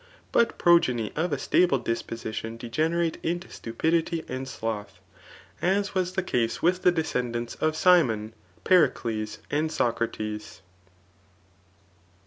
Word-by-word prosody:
But 235 - +2
progtoy 125 -10 +3
of 170 +3 -1
a - - 0
stable 175 -6 +3
disposition 115 -1 -4
degenerate 160 +8 -1
into 175 +2 -3
stupidity 160 +7 -1
and 130 +1 -5
sloth; 105 -5 -5 0.6
as 200 +3 +1
was 185 -1 0
the 190 -1 -1
case 115 -8 0
with 180 +2 +2
the 180 - +5
descendants 125 -8 -2
of 155 0 +2
Girkhi, 125 - +3 0.3
Pericles, 115 -11 +2
and 155 +2 0
Socrates. 110 -5 -2
140 Hz, 115 wpm, -26 LUFS, 115-175 Hz, 0.6 s, the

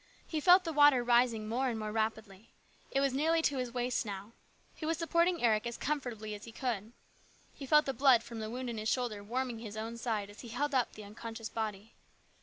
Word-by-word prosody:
He 315 - -2
felt 360 +4 +7
the 330 -2 -3
water 290 -4 +6
rising 235 -2 +3
more 255 +4 0
and 230 - -3
more 215 -1 -4
rapidly. 220 -2 -3 0.4
It 275 - +1
was 275 -2 +1
nearly 320 +4 +2
to 280 - +1
his 250 -1 -3
waist 245 0 -1
now. 200 0 -7 0.4
He - - -12
was 320 +1 0
supporting 335 -1 +1
Eric 220 -1 +3
as 235 - -5
comfortably 245 -8 -3
as 205 0 -8
he 230 - -10
could. 225 -3 -3 0.6
He 275 - -9
felt 300 +2 +5
the 270 - -1
blood 260 -4 +5
from 230 -1 -8
the 215 0 -4
wound 250 +2 -4
in 235 -2 -4
his 215 +1 -1
shoulder 230 -5 -1
warming 245 +2 -3
his 215 -2 -8
own 225 +2 -5
side 215 -4 -2
as 205 - -15
he 240 - -9
held 280 +6 -2
up 255 -3 +1
the 215 - -10
unconscious 225 +2 -7
body. 215 -1 -4
235 Hz, 220 wpm, -32 LUFS, 220-270 Hz, 0.6 s, felt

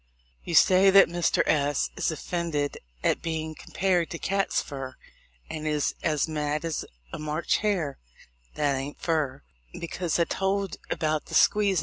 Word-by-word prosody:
You - - -3
say 190 +1 +6
that 195 -1 +7
Mr. 175 -1 +2
S 145 -2 +1
is - - 0
offended 160 -3 -2 0.2
at - - +2
being 160 -1 -3
compared 180 +1 0
to 170 - -5
cats' 195 +3 0
fur, 135 -2 -6 0.5
and 155 0 -5
is 150 -1 0
as 155 -2 +1
mad 150 0 -2
as 165 -2 -2 0.3
a - - -4
March 155 +2 0
hare 185 -10 -1 0.6
(that 145 -2 +1
ain't 135 +2 -5
fur), 155 - -1 0.4
because 170 0 -2
I 170 - +4
told 195 +2 -1
about 155 -1 -1
the - - -5
squeezin'. 200 -4 +4
160 Hz, 150 wpm, -27 LUFS, 150-180 Hz, 0.6 s, that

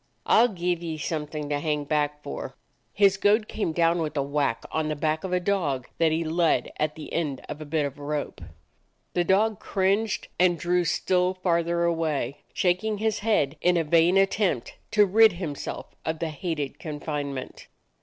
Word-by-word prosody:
I - - +5
'll 240 - +6
give 175 -5 -2
ye 165 -2 -4
something 150 0 -4
to 145 -1 0
hang 150 -1 -1
back 150 0 -1
for!" 70 - -6 0.4
His 200 -1 +4
goad 210 +2 +3
came 210 -6 -2
down 170 +1 +2
with 155 -1 -3
a 140 - +2
whack 140 -4 -1
on 160 -1 -1
the 155 - -1
back 155 +1 -1
of 190 - -4
a 180 - +2
dog 170 -9 -1
that 165 -1 +4
he 160 +1 0
led 165 +1 +1
at 155 0 0
the 155 - -9
end 150 -5 -1
of 150 +1 -7
a - - -6
bit 150 0 0
of 140 +1 -6
rope. 145 -7 -4 0.7
The 175 - +2
dog 205 +3 +2
cringed 200 +3 0
and 180 -1 +4
drew 175 +3 +1
still 180 +2 +1
farther 170 -2 +1
away, 155 -6 -1
shaking 190 +4 0
his 220 0 0
head 160 -10 +1
in 180 0 +3
a 165 - +2
vain 170 +4 +4
attempt 195 - +1
to 210 -1 +5
rid 215 +1 +6
himself 170 -5 -6
of 160 0 -2
the 165 0 -2
hated 155 -2 -4
confinement. 145 -3 -5
165 Hz, 185 wpm, -26 LUFS, 150-185 Hz, 0.7 s, ll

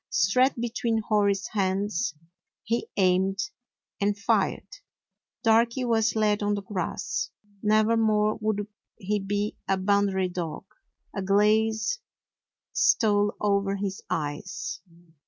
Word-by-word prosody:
Straight 225 +9 +3
be 235 0 -2
tween 225 -2 0
Hori's 200 -2 +2
hands 195 -4 -1 0.5
he 230 +3 -2
aimed 190 0 +3 0.6
and 205 0 +1
fired. 200 - +1 0.8
Darky 235 +3 +3
was 225 -2 +2
laid 210 -1 +2
on 205 0 +1
the 200 - -5
grass. 190 0 -3 0.3
Nevermore 215 0 +3
would 210 -1 0 0.3
he 205 +2 -1
be 205 +2 -2
a 195 - +2
Boundary 195 -1 +2
dog. 175 -1 -5 0.5
A 200 - -2
glaze 215 - +2 0.7
stole 205 -2 +3
over 200 -1 +1
his 195 -1 -4
eyes. 150 +3 -4
205 Hz, 110 wpm, -26 LUFS, 195-220 Hz, 0.8 s, Straight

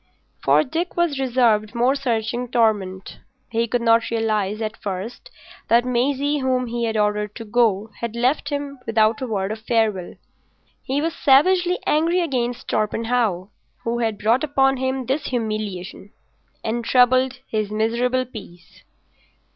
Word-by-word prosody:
For 145 +3 +4
Dick 335 +6 -3
was 335 -5 +1
reserved 235 -5 +2
more 245 +3 +3
searching 240 -2 -2
torment. 205 -5 0 0.3
He 230 0 0
could 240 +1 -1
not 230 0 +3
realise 215 -3 -1
at 220 -1 -3
first 205 - -5 0.4
that 235 +1 +4
Maisie, 275 +4 0
whom 255 -1 0
he 235 0 -2
had 225 -1 -1
ordered 210 0 0
to 230 - -7
go 220 -2 +1
had 235 -1 -4
left 255 +4 +1
him 285 -2 -4
without 220 0 +2
a 260 - -2
word 200 -3 -2
of 220 - -5
farewell. 220 -5 0 0.7
He 275 +2 -1
was 330 0 -1
savagely 355 +6 +4
angry 330 +4 +2
against 250 -7 -2
Torpenhow, 215 -3 0 0.3
who 235 +1 -1
had 225 -3 -1
brought 230 +7 +2
upon 270 -2 +2
him 260 0 -2
this 270 +5 -1
humiliation 215 -5 -4 0.5
and 235 +2 -2
troubled 255 +2 +3
his 215 -2 -2
miserable 235 +4 0
peace. 185 -8 -13
235 Hz, 145 wpm, -22 LUFS, 215-260 Hz, 0.7 s, For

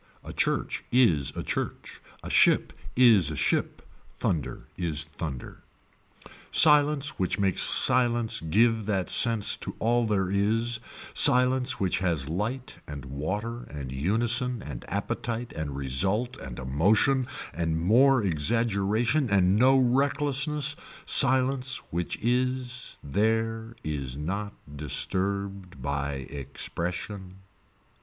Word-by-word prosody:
A - - -9
church - - -2
is 95 - +3
a - - -3
church. - - -5 0.2
A - - -7
ship - - +3 0.2
is 115 - +5
a 75 - -5
ship. - - -1 0.3
Thunder 80 -5 -3
is 80 -3 0
thunder. 75 -5 -8 0.9
Silence 150 -2 +3
which 95 0 0
makes 95 -3 0
silence 120 -2 +4
give 110 +6 +1
that 95 -4 -2
sense 115 -3 +3
to - - -7
all 120 +1 +1
there 95 -3 -1
is, 110 +4 +1 0.3
silence 125 +1 +4
which 95 -2 0
has 85 -7 -1
light 110 +10 -4
and 70 -2 -8
water 100 - -5
and 70 -3 -8
unison 115 - -1
and 65 -5 -8
appetite 120 +1 -4
and 75 -3 -5
result 95 - -1
and 65 -3 -9
a 65 - -7
motion 105 - +1 0.3
and 80 0 -2
more 125 +8 +3
exaggeration 110 - 0
and 95 -1 +3
no 130 +5 +4
recklessness, 140 +3 +1 0.3
silence 130 0 +4
which 85 +1 -3
is 125 +1 -1
there 110 +6 -1
is 70 -4 -4
not 100 +7 -4 0.2
disturbed 95 +3 -3
by 70 +2 -3
expression. 90 - -6
105 Hz, 115 wpm, -26 LUFS, 80-125 Hz, 0.9 s, is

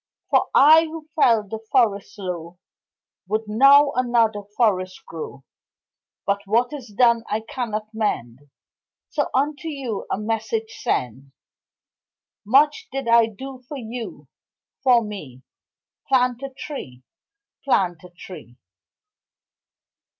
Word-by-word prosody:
For - - +3
I 315 +4 +7
who 315 -1 -8
fell 230 -8 +3
the 220 +2 -5
forest 215 -7 +1
low 175 -3 -6 0.7
Would 215 +2 -2
now 275 +6 +6
another 235 -4 +1 0.2
forest 185 -6 0
grow, 155 -4 -8 0.8
But 200 +1 0
what 240 +6 +1
is 270 -5 -7
done 235 +2 +3
I 215 +1 -1
cannot 220 -2 -5
mend, 125 - -2 0.7
So 295 -2 -1
unto 285 +3 0
you 270 -9 -4
a - - 0
message 225 +1 -2
send 130 +3 -2 1.1
Much 295 - +3
did 270 -2 -4
I 230 -1 +5
do 260 +4 -9
for 290 - -5
you, 235 -1 -7 0.5
for 245 -3 +4
me 150 - -9 0.6
Plant 250 -2 +2
a 275 - -5
tree, 260 - -8 0.6
Plant 180 - +1
a 180 - -12
tree. 165 - -12
225 Hz, 115 wpm, -22 LUFS, 195-265 Hz, 1.1 s, I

